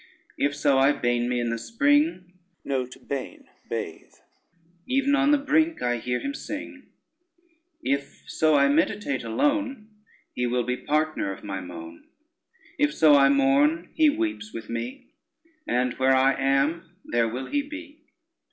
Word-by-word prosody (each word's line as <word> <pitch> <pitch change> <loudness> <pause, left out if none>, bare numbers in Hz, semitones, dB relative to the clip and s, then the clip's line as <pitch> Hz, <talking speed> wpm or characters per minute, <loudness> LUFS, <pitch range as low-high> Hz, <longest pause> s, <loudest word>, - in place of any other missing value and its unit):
If 145 0 0
so 140 -2 +2
I 135 +2 +5
bain 120 -1 0
me 125 -1 0
in 120 -1 -1
the 115 - -3
spring, 280 - +1 0.3
Even 130 -2 -1 2.3
on 285 0 +3
the 295 - +5
brink 315 +3 +1
I 120 0 +1
hear 125 +1 -2
him 280 - -4
sing: 290 -2 -7 1.0
If 140 0 -2
so 155 -1 +2
I 140 -1 +5
meditate 155 - 0
alone, 265 - -1 0.4
He 125 0 -1
will 125 0 0
be 125 +1 -1
partner 155 -8 -1
of 95 - -9
my 95 -1 -4
moan. 85 -2 -10 0.7
If 295 +1 +2
so 155 -2 +6
I 140 -1 +6
mourn, 140 +5 +2
he 315 -2 +4
weeps 315 -8 -2
with 115 -1 -8
me, 115 - -6 0.6
And 125 0 +1
where 130 0 +4
I 135 +1 +4
am 140 +6 0
there 120 -1 +1
will 125 +3 -5
he 290 - 0
be. 300 +1 -10
140 Hz, 145 wpm, -25 LUFS, -, 2.3 s, so